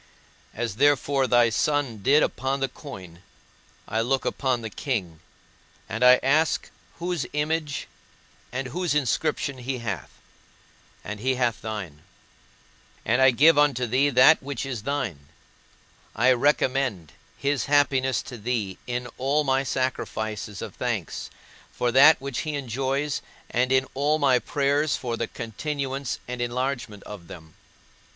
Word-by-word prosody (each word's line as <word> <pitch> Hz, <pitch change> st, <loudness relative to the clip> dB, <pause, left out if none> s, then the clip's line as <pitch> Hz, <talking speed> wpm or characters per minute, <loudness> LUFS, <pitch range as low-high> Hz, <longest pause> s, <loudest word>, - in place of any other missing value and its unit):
As 115 Hz, -3 st, -3 dB
therefore 140 Hz, -1 st, +3 dB
thy 120 Hz, -2 st, +4 dB
Son 140 Hz, -2 st, 0 dB
did 140 Hz, +9 st, +4 dB
upon 135 Hz, +4 st, -1 dB
the 135 Hz, -, 0 dB
coin, 95 Hz, -, -11 dB, 0.7 s
I 110 Hz, -, 0 dB
look 130 Hz, +3 st, 0 dB
upon 130 Hz, -3 st, 0 dB
the 110 Hz, -, -4 dB
king, 95 Hz, -, -3 dB, 0.7 s
and 115 Hz, +4 st, -2 dB
I 125 Hz, 0 st, +8 dB
ask 150 Hz, +4 st, +2 dB, 0.3 s
whose 175 Hz, -2 st, -2 dB
image 150 Hz, 0 st, -1 dB, 0.6 s
and 130 Hz, +1 st, -3 dB
whose 175 Hz, +2 st, -1 dB
inscription 140 Hz, 0 st, 0 dB
he 130 Hz, +1 st, -3 dB
hath, 105 Hz, -7 st, -4 dB, 0.9 s
and 105 Hz, +1 st, -6 dB
he 130 Hz, +4 st, 0 dB
hath 120 Hz, -3 st, 0 dB
thine; 100 Hz, -9 st, -6 dB, 1.0 s
and 130 Hz, -, +2 dB
I 130 Hz, -, +8 dB
give 145 Hz, +5 st, +5 dB
unto 140 Hz, -4 st, +3 dB
thee 130 Hz, +5 st, +2 dB
that 130 Hz, +4 st, +6 dB
which 140 Hz, -2 st, -4 dB
is 125 Hz, -5 st, -4 dB
thine; 105 Hz, -, -3 dB, 0.9 s
I 125 Hz, +4 st, +4 dB
recommend 130 Hz, -, +1 dB, 0.3 s
his 140 Hz, -3 st, 0 dB
happiness 135 Hz, -4 st, +2 dB
to 125 Hz, -, -9 dB
thee 105 Hz, -4 st, -2 dB
in 125 Hz, 0 st, -2 dB
all 140 Hz, +4 st, +2 dB
my 135 Hz, -1 st, +2 dB
sacrifices 110 Hz, -6 st, -3 dB
of -, -, -7 dB
thanks, -, -, -3 dB, 0.4 s
for 120 Hz, -, -1 dB
that 145 Hz, +5 st, +7 dB
which 135 Hz, -2 st, -4 dB
he 155 Hz, -1 st, -3 dB
enjoys, 135 Hz, +2 st, -2 dB, 0.3 s
and 125 Hz, +1 st, +1 dB
in 130 Hz, 0 st, +3 dB
all 145 Hz, +3 st, +1 dB
my 135 Hz, -4 st, +3 dB
prayers 145 Hz, +4 st, +1 dB
for 120 Hz, -2 st, -3 dB
the -, -, -2 dB
continuance 135 Hz, +3 st, -4 dB
and 125 Hz, 0 st, -4 dB
enlargement 120 Hz, -3 st, -3 dB
of 95 Hz, -5 st, -10 dB
them. 80 Hz, -3 st, -12 dB
130 Hz, 140 wpm, -25 LUFS, 115-140 Hz, 1.0 s, I